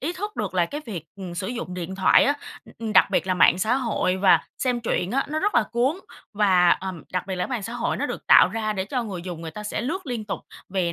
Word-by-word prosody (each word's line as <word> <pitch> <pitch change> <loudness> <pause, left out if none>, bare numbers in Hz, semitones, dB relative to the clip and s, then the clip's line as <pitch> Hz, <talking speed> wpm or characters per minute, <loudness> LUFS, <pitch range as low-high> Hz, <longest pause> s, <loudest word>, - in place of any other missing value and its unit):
ý 315 +6 -2
thức 415 +3 -6
được - - -3
là 175 -2 +2
cái 295 - -6
việc, 175 -8 -6
ừm, 185 -3 -7
sử 175 +2 -3
dụng 235 -7 -5
điện 180 +1 -5
thoại 190 0 +5
á, 285 - +2 0.3
ừm, - - -17
ừm, 225 -2 -3
đặc - - +6
biệt - - +1
là 185 - +1
mạng 180 0 +5
xã 220 +6 +2
hội 225 -7 0
và 190 0 +5 0.2
xem 250 -2 0
truyện 195 -5 -1
á, 275 - +1
nó 305 +1 -2
rất 415 +6 0
là - - +5
cuốn 255 +7 +1 0.4
và, 185 -4 +4
ờm, 185 -3 -1
đặc 180 0 -2
biệt 190 -2 -3
là 180 - -1
cái - - -6
mạng 240 -5 -2
xã 230 - -5
hội 240 - -1
nó - - -1
được - - -6
tạo - - +7
ra 215 -1 -2
để 190 -2 -2
cho 250 +5 -2
người 185 -5 -6
dùng 175 -3 -6
người 160 - -5
ta 210 +6 -8
sẽ 210 - -3
lướt 325 +7 -3
liên 235 -4 -3
tục. 210 - -4 0.3
Vì 180 -3 -1
205 Hz, 285 wpm, -24 LUFS, 180-245 Hz, 0.4 s, tạo